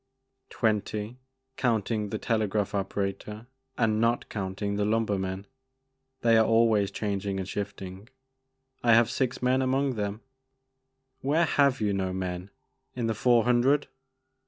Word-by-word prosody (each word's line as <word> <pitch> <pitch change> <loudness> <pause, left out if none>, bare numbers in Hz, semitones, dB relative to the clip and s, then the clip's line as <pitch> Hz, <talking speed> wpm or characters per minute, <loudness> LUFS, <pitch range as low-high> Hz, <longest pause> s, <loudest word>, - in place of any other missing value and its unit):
" 130 0 -52
Twenty 110 +1 -1 0.4
counting 110 -3 0
the 110 - -2
telegraph 105 -2 0
operator 100 +2 -3 0.3
and 110 -1 +2
not 115 +1 +1
counting 100 0 -3
the 105 - 0
lumbermen; 100 -3 -1 0.8
they 115 -1 +5
are - - +6
always 115 -3 +3
changing 100 -1 -3
and 95 - -4
shifting. 100 0 -6 0.7
I 115 -2 +6
have 115 0 +4
six 125 -2 -1
men 130 +1 +3
among 135 +1 +1
them." 105 -1 -3 1.0
"Where 155 +5 +2
have 140 -4 +2
you 105 -1 +1
no 95 -1 -1
men? 90 0 -4 0.5
In 120 -2 -2
the 115 - +1
Four 120 +1 +3
Hundred?" 125 +4 +2
110 Hz, 135 wpm, -28 LUFS, 100-120 Hz, 1.0 s, are